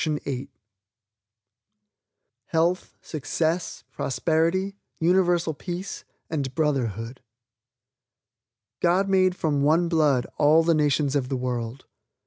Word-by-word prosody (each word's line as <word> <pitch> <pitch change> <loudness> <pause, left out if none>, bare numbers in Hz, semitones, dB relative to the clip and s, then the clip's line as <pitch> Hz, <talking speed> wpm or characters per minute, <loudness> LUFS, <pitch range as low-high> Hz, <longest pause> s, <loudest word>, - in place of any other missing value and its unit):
HEALTH, 170 +3 0
SUCCESS, 160 +3 -2
PROSPERITY, 170 +7 0 0.2
UNIVERSAL 175 -1 +2
PEACE 180 +5 -6 0.2
AND 140 -5 -3
BROTHERHOOD 125 - -1 1.6
"God 180 +3 +2
Made 185 -1 +3
From 150 -5 0
One 165 +4 +3
Blood 150 -7 +3
All 155 +2 +5
the 165 0 +3
Nations 145 -2 +1
of 130 -3 0
the 135 - -1
World." 125 0 -4
160 Hz, 90 wpm, -25 LUFS, 140-175 Hz, 1.6 s, All